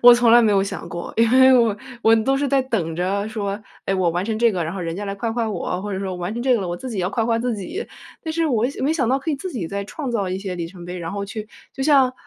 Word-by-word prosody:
我 245 0 +10
从 240 -1 +4
来 240 - +9
没 215 - +4
有 195 -1 +4
想 195 -3 -5
过， 170 +1 -6
因 230 0 +4
为 260 0 +7
我 225 -3 +3 0.3
我 225 - +6
都 270 +5 +2
是 285 +1 0
在 275 -1 +3
等 185 -11 -2
着 200 +4 -1
说， 205 -1 -3 0.3
哎， 195 - +1
我 180 -3 +2
完 175 +3 -1
成 220 0 -2
这 235 -1 +4
个， 180 -3 -1
然 165 - -4
后 190 - -4
人 165 -1 -3
家 205 - -4
来 195 - -3
夸 225 +2 -2
夸 230 -1 -1
我， 180 -1 -3
或 205 -1 -4
者 190 - -2
说 195 -1 -3
我 - - -5
完 180 +4 -3
成 240 - -3
这 255 -1 +4
个 225 - +1
了， 180 - -3
我 175 - -2
自 260 - -7
己 210 - -4
要 180 +1 0
夸 225 0 0
夸 230 -1 +2
自 235 -1 -1
己。 350 - -5 0.4
但 320 - -3
是 330 0 +1
我 240 -3 +2
想 275 - -4
没 305 - +2
想 265 -8 0
到 265 +2 +3
可 295 - -7
以 - - +1
自 370 +7 -5
己 195 -10 -3
再 200 0 -3
创 275 +5 -5
造 200 -5 -1
一 185 - -2
些 190 -2 -4
里 170 -1 -3
程 175 -1 -11
碑， 180 +1 -6
然 165 -1 -4
后 200 0 -3
去 210 +1 -7 0.2
就 265 - -4
像， 270 -4 +5
215 Hz, 350 characters per minute, -22 LUFS, 190-250 Hz, 0.4 s, 我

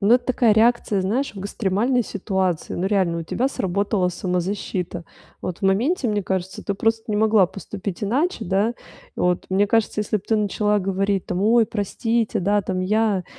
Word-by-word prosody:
Ну, 205 +3 +4
это 245 0 +1
такая 245 -3 +3
реакция, 220 -2 +3
знаешь, 230 +9 -1
в 195 - -7
экстремальной 225 +5 0
ситуации. 190 -5 -2
Ну, 180 - -2
реально, 185 -5 +1
у - - -4
тебя 250 +10 -1
сработала 195 -3 0
самозащита. 180 -1 -3 0.4
Вот 180 - -4
в - - -27
моменте, 235 - +1
мне 205 -1 0
кажется, 190 0 -3
ты 200 - -2
просто 225 +2 0
не 210 - 0
могла 215 -3 +4
поступить 195 +1 -7
иначе, 270 - 0
да? 205 +5 +1 0.4
Вот, 180 0 0
мне 195 +2 +2
кажется, 220 0 +1
если 210 +1 0
б - - -16
ты 220 - +3
начала 210 0 +1
говорить: 195 0 0
"Ой, 220 +6 +4
простите, 225 +2 -1
да, 205 +3 +2
там, 185 -1 -3
я 205 -1 +1
205 Hz, 175 wpm, -22 LUFS, 190-225 Hz, 0.4 s, Ну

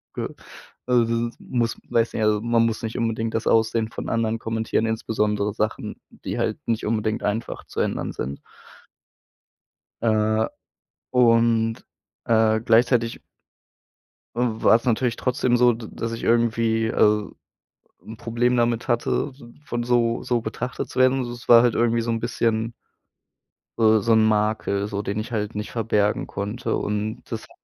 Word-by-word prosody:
G - - -2 0.6
also 120 -2 +4 0.2
das - - -16
ist - - -39
muss 120 -2 -2
weiß 115 0 +1
nicht, 110 - -1
also, 105 -1 +2
man 115 0 +2
muss 115 -1 -2
nicht 115 +1 -4
unbedingt 115 -1 -1
das 115 - -1
Aussehen 110 0 +2
von - - -6
anderen 115 -1 0
kommentieren, 110 0 -1
insbesondere 105 -2 -1
Sachen, 110 +1 -3
die - - -6
halt - - 0
nicht 115 -1 -1
unbedingt 110 0 -1
einfach 110 +3 -3
zu - - -6
ändern - - -1
sind. 70 +2 -5 1.6
Äh, 110 -1 +2 0.6
und, 115 -2 +3 0.4
äh, 110 -1 +3
gleichzeitig 115 +1 +2 1.2
w 120 -2 -1
war - - +7
es 120 - -13
natürlich 120 0 +1
trotzdem 125 -1 +1
so, 120 0 +5
d 110 -1 -8
dass 115 0 -4
ich 115 - -6
irgendwie 115 -1 +2
also, 105 0 +2 0.7
'n 110 - -9
Problem 120 +2 0
damit 120 -1 +1
hatte, 120 +4 0
s 135 - -18 0.2
von 120 -5 -3
so 120 -1 +1
so 120 -1 0
betrachtet 115 +3 -4
zu - - -3
werden. 130 +1 +4
Also, 120 -2 -3
es 120 0 -11
war 115 0 +8
halt 120 -2 +2
irgendwie 115 0 +2
so 115 0 -2
'n 115 - -2
bisschen 115 -1 -1 1.1
so 110 -1 +4
so 115 +3 +2
'n 110 0 +5
Makel, 105 -1 0
so, 100 -1 -3
den 100 +1 -3
ich 110 +3 -5
halt 105 -2 -2
nicht 105 0 -4
verbergen 105 -3 0
konnte. 105 +5 -3
Und 105 +1 -3
das - - -4
hat - - -16
115 Hz, 165 wpm, -23 LUFS, 110-120 Hz, 1.6 s, war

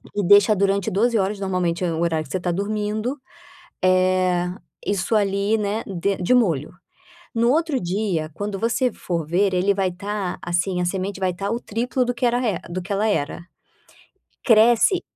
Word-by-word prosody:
e 205 - 0
deixa 205 +3 +6
durante 200 0 +1
12 230 +5 +2
horas, 200 +1 0
normalmente 185 -3 -1
é 170 - 0
o 160 - -3
horário 160 -2 0
que 135 - -14
você 185 - -1
tá 175 0 -1
dormindo, 210 +6 -2 0.7
eh, 185 -1 +2 0.4
isso 200 +2 0
ali 200 +1 +1
né, 210 +1 -2
den 195 +1 -1
de 180 - +2
molho. 170 - +2 0.6
No 235 +1 +3
outro 315 -1 +1
dia 180 -4 -2
quando 205 +1 -4
você 235 +4 +1
for 170 -6 -4
ver 190 +5 +1
ele 190 +2 +2
vai 190 -1 0
tá 195 0 -4
assim, 175 +1 -1
a - - 0
semente 190 +2 -3
vai 185 -1 0
tá 195 +3 -3
o 230 +2 -2
triplo 245 +4 -1
do 245 0 -2
que 240 - -3
era 240 0 +2
re 215 -8 0
do 180 +2 -3
que 195 +4 -5
ela 200 +2 +1
era. 145 -6 -1 1.0
Cresce 235 - +5
200 Hz, 180 wpm, -22 LUFS, 180-220 Hz, 1.0 s, deixa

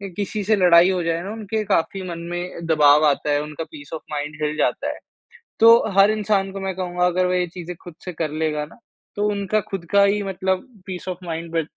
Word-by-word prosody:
किसी 205 +1 -3
से 215 +2 +3
लड़ाई 180 -2 +6
हो 180 -2 -1
जाए 165 0 -1
ना 200 - -5
उनके 220 0 -3
काफ़ी 195 +2 0
मन 170 -1 -5
में 175 -1 -5
दबाव 150 -1 +5
आता 145 +1 +1
है 145 - +2
उनका 150 +2 -6
पीस 145 -2 -11
ऑफ़ 160 - -7
माइंड 150 +1 -4
हिल 150 0 -1
जाता - - 0
है। - - -12 0.6
तो 230 +1 +9 0.2
हर 195 +2 +7
इंसान 205 -2 0
को 195 - -6
मैं 190 -1 -3
कहूँगा 180 -1 0
अगर 180 +1 +1
वह 180 0 +1
ये 180 - 0
चीज़ें 180 -1 -7
खुद 175 - -10
से 180 - -5
कर 160 -1 -3
लेगा 150 -1 -1
ना, 155 - -18 0.4
तो 205 0 +1
उनका 205 +1 0
खुद 195 -3 -4
का 200 0 +6
ही 205 +1 +2
मतलब 190 +4 -2 0.2
पीस 185 -1 -6
ऑफ़ 180 -1 -4
माइंड 165 -1 -5
बे 165 -1 +1
180 Hz, 230 wpm, -22 LUFS, 165-195 Hz, 0.6 s, तो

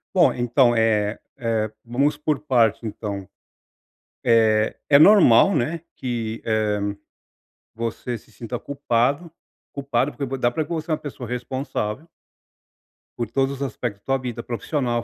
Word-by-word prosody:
Bom, 175 -2 +6
então, 120 0 +3
eh 110 -2 +1 0.2
eh, 110 -2 -1
vamos 140 +5 +1
por 150 -1 -1
partes, 120 -7 +2
então. 100 -3 -5 1.0
Eh, 110 -2 +3
é 140 - +7
normal, 190 - +7
né, 155 +4 -1 0.2
que, 115 -3 -3
eh, 110 -2 +1 1.0
você 115 +1 -3
se 110 - -21
sinta 120 +2 -6
culpado 140 +4 -1 0.4
culpado 140 -1 -1
porque 140 - -4
vo 135 +1 -4
dá 120 -1 +2
pra 155 +6 -2
ver - - -12
que - - -4
você 160 0 -4
é 155 - +2
uma - - -8
pessoa 130 -5 -7
responsável 125 +1 -4 1.1
por 120 -3 -3
todos 135 +3 +1
os - - -11
aspectos 120 -6 -4
da - - -53
tua 135 0 +1
vida 120 -3 -5
profissional, 120 -1 -2
120 Hz, 150 wpm, -23 LUFS, 115-140 Hz, 1.1 s, é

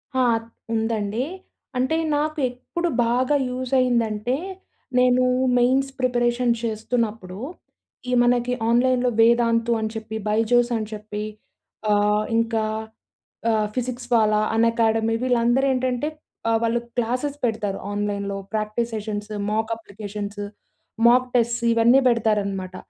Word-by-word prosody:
ఆ! 260 - +3 0.5
ఉందండీ. 220 +1 -1 0.5
అంటే 260 +5 +1 0.2
నాకు 305 +1 -1
ఎప్పుడు 340 +8 -4 0.2
బాగా 255 +5 +2
యూజ్ 255 0 -4
అయ్యిందంటే, 235 -1 +1 0.6
నేనూ 250 0 +4 0.3
మెయిన్స్ 260 +3 +3
ప్రిపరేషన్ 240 -1 +2
చేస్తున్నప్పుడూ, 220 -3 -2 0.7
ఈ - - -1
మనకి 245 0 +2 0.2
ఆన్లైన్‌లో 250 +1 +3
వేదాంతు 230 0 +3
అని 220 0 -2
చెప్పి, 220 0 -6
బైజోస్ 235 +3 +2
అని 215 -1 -3
చెప్పి, 210 0 -5 0.7
ఆహ్, 210 +1 +2
ఇంకా 225 -1 +1 0.9
ఆహ్, 215 -1 +2
ఫిజిక్స్ 250 0 -4
వాలా, 215 -2 +4 0.2
అన్ఎకాడమీ 225 -1 +2
వీళ్ళందరు 245 +1 +2
ఏంటంటే 255 +2 -1 0.4
ఆహ్, 225 - +3
వాళ్ళు 230 +1 +1 0.2
క్లాసెస్ 255 +5 -1
పెడతారు. 210 -3 -2
ఆన్లైన్‌లో 200 -1 -2 0.2
ప్రాక్టీస్ 215 +2 -1
సెషన్స్, 210 0 -4 0.2
మాక్ 220 +1 -1
అప్లికేషన్స్, 205 -1 -7 0.7
మాక్ 250 +1 +5
టెస్ట్స్ 235 0 +1
ఇవన్నీ 235 +3 +5
పెడతారనమాట. 200 -5 0
230 Hz, 110 wpm, -23 LUFS, 215-250 Hz, 0.9 s, మాక్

